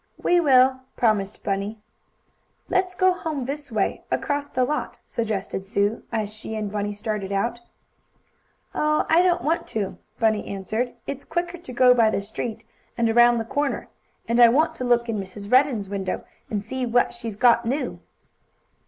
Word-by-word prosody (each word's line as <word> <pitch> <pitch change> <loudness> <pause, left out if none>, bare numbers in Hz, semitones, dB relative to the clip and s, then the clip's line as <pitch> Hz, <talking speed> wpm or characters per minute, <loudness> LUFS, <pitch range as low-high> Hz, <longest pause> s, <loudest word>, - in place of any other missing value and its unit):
"We 350 - +3
will!" 260 -4 +5 0.2
promised 210 -4 +1
Bunny. 200 +2 -2 0.9
"Let's 370 -1 +1
go 370 0 +4
home 310 -7 -4
this 285 0 -5
way, 215 -3 -1
across 285 0 -1
the 255 - +1
lot," 300 +4 -3
suggested 210 -4 -3
Sue, 200 +2 0
as 215 -2 -2
she 220 +1 -7
and 210 -2 -3
Bunny 205 0 -2
started 205 -1 -4
out. 235 +5 -1 1.1
"Oh, 305 0 +1
I 330 +2 +6
don't 360 -1 +2
want 325 +3 0
to," 205 -3 -3 0.2
Bunny 220 -3 +2
answered. 220 +5 -3
"It's 280 0 -5
quicker 345 +1 -3
to 295 - -10
go 250 0 +6
by 230 -3 +4
the 215 - 0
street, 220 +2 -5 0.3
and 230 -1 +2
around 240 +1 +6
the 225 - -2
corner. 285 +4 -2 0.4
And 235 +1 +1
I 240 - +10
want 300 +7 +3
to - - -4
look 240 -1 +2
in 220 -3 -2
Mrs. 200 +2 -8
Redden's 255 -6 +3
window, 190 -1 -3 0.2
and 205 -2 -2
see 260 +4 -4
what 245 0 +2
she's 225 -3 -6
got 235 +1 +4
new." 275 +5 -2
235 Hz, 170 wpm, -24 LUFS, 210-275 Hz, 1.1 s, I